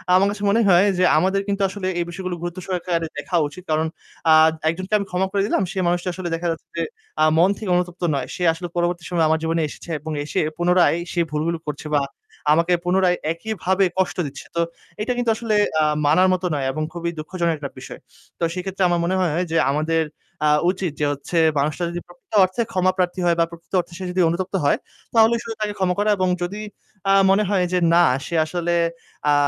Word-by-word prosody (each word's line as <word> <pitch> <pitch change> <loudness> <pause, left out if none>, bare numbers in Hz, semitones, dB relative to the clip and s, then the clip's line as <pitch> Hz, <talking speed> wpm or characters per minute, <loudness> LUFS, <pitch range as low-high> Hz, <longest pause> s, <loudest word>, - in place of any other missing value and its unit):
আমার 195 +2 +5
কাছে 205 0 -6
মনে 230 +3 +3
হয় 180 +2 +6
যে - - +4
আমাদের 190 +4 +2
কিন্তু 200 0 -1
আসলে 195 -1 -4
এই 170 - 0
বিষয়গুলো 180 0 -4
গুরুত্ব 175 +1 -4
সহকারে 175 -3 -1
দেখা 175 +5 -3
উচিত। 175 +5 -12
কারণ 160 +1 +1 0.4
আ - - +9 0.4
একজনকে 185 +5 -4
আমি 200 - -3
ক্ষমা 185 +1 +1
করে 200 - +1
দিলাম। 205 - +1
সে 195 - -8
মানুষটা 175 +1 0
আসলে 180 -2 -4
দেখা 170 +1 -3
যাচ্ছে 165 0 -7
যে, 165 - +1 0.4
আ - - +6
মন 180 +3 +5
থেকে 200 -4 -3
অনুতপ্ত 180 0 -2
নয়। - - -2
সে 180 - -4
আসলে 175 +1 -6
পরবর্তী 175 0 0
সময়ে 170 -3 +2
আমার 160 0 +2
জীবনে 165 0 0
এসেছে 170 - -11
এবং 160 +2 -6
এসে 150 - -2 0.2
পুনরায় 175 -1 +3 0.2
সে 175 - +1
ভুলগুলো 160 +2 -1
করছে 150 +1 -6
বা 145 - +4 0.5
আমাকে 170 +2 +2
পুনরায় 180 0 +3
একইভাবে 190 +1 0
কষ্ট 185 - 0
দিচ্ছে। 135 0 -9
তো 170 - +2 0.4
এইটা 250 +3 0
কিন্তু 240 -2 +2
আসলে 220 -2 -1 0.3
আ - - +4 0.2
মানার 180 +6 +4
মতো 185 0 -2
নয় 140 -2 -1
এবং 155 +3 -3
খুবই 170 0 -3
দুঃখজনক 170 +1 -1
একটা 140 -2 -6
বিষয়। - - -9 0.4
তো - - -3
সেক্ষেত্রে 190 +1 -2
আমার 175 0 +1
মনে 185 +2 0
হয় 170 0 +1
যে 165 - +2
আমাদের 160 +2 +1 0.5
আ - - +4 0.2
উচিত 185 -4 -3
যে 150 - +2
হচ্ছে 145 +5 -5 0.2
মানুষটা 155 +4 -1
যদি 175 0 -4
প্রকৃত 175 +5 -20
অর্থে 185 +6 0
ক্ষমাপ্রার্থী 185 -1 +1
হয় 170 -1 +3
বা 165 - +4
প্রকৃত 170 +3 -14
অর্থে 175 - -5
সে 190 - -6
যদি 185 0 +1
অনুতপ্ত 185 +3 -2
হয় - - +3 0.4
তাহলে 225 +1 +6
শুধু 225 -1 -6
তাকে 210 -1 -1
ক্ষমা 180 -1 +1
করা 210 +1 +2
এবং 185 0 +1 0.2
যদি 205 +4 -4 0.5
আ - - +6 0.2
মনে 200 +2 +4
হয় 185 -3 +2
যে 180 - +3 0.2
না 175 - +6 0.2
সে 170 - -3
আসলে 175 +1 -2 0.6
আ - - +5
180 Hz, 210 wpm, -22 LUFS, 165-190 Hz, 0.6 s, আ